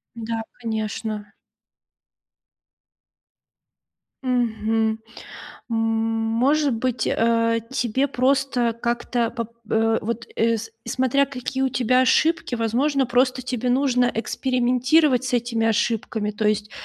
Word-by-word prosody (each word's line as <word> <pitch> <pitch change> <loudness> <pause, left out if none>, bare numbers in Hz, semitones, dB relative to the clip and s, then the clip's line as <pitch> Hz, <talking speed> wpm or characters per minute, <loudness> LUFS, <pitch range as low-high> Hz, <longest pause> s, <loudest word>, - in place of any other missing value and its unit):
Да, 230 0 -3 0.2
конечно. 215 -2 -4 2.9
Мгм. 225 -3 0 0.7
Может 225 +5 +1
быть, 235 0 -1
э, 230 0 +2
тебе 265 +1 0
просто 260 -2 +1
как-то 235 0 -1
поп 230 -2 -5 0.2
э, 225 0 +2
вот, 235 +2 -3
э, 230 0 +2
с 225 +1 -7 0.2
смотря 260 +3 +2
какие 265 0 -4
у 265 - +2
тебя 255 0 +2
ошибки, 310 +3 +2
возможно, 260 +4 +1
просто 250 +1 +1
тебе 250 0 -2
нужно 250 -1 +2
экспериментировать 255 +4 +2
с 255 - -3
этими 235 -1 0
ошибками. 220 -1 0
То 210 0 0
есть 210 0 -1
235 Hz, 105 wpm, -23 LUFS, 225-255 Hz, 2.9 s, э